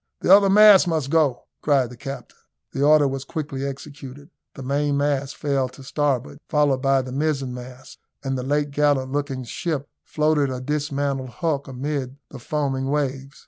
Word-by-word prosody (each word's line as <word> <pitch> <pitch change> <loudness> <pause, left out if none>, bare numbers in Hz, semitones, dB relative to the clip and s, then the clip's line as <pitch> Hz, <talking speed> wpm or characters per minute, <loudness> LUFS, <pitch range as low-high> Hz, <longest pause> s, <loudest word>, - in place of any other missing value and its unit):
"The 190 - +7
other 200 -1 +4
masts 210 -1 +7
must 155 -5 -1
go," 150 -6 +2 0.2
cried 135 -5 +2
the - - -10
captain. 135 -1 -8 0.3
The 135 - -4
order 150 0 +5
was 135 0 -4
quickly 140 -2 -5
executed. 140 0 -9 0.2
The 135 - -8
mainmast 140 0 0
fell 140 -3 0
to 135 - -14
starboard, 140 0 -1
followed 145 -4 +2
by 135 -1 +2
the 130 - -8
mizen 140 -2 -1
mast, 125 +1 -11 0.2
and 135 -1 -2
the 130 - -2
late 145 +2 -1
gallant 145 -2 +1
looking 140 -2 -2
ship 145 +3 -3 0.2
floated 150 -2 +1
a 130 -1 -4
dismantled 140 -1 -2
hulk 145 +1 -2
amid 135 0 -4
the 135 - -10
foaming 135 0 -2
waves. 135 -1 -2
140 Hz, 165 wpm, -23 LUFS, 130-150 Hz, 0.3 s, The